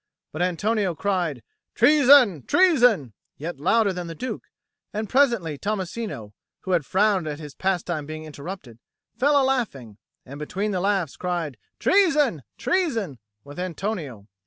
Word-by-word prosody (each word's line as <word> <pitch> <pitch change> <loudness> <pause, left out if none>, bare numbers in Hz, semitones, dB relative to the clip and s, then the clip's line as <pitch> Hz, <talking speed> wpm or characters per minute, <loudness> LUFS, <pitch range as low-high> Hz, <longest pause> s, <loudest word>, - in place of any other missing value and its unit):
But 155 - -5
Antonio 185 +1 0
cried 175 - -1 0.3
"Treason, 255 - +6
treason," 245 - +4 0.2
yet 160 0 -6
louder 200 +5 +2
than 180 -1 -5
the 165 - -7
Duke; 255 +6 -5 0.5
and 215 0 -3
presently 235 - +2
Tommasino, 200 - -4 0.3
who 190 - -5
had 170 -6 +1
frowned 195 -3 +2
at 150 -1 -4
his 150 -2 -9
pastime 175 -5 -2
being 155 0 -6
interrupted, 150 - -9 0.4
fell 285 +2 +3
a 270 - +3
laughing, 140 - -2 0.3
and 140 +3 -10
between 195 +8 -3
the 185 -2 -1
laughs 195 -6 0
cried 175 -6 -3 0.2
"Treason, 305 - +3 0.2
treason!" 230 - -1 0.2
with 145 +4 -10
Antonio. 170 - -4
185 Hz, 135 wpm, -24 LUFS, 155-225 Hz, 0.5 s, Treason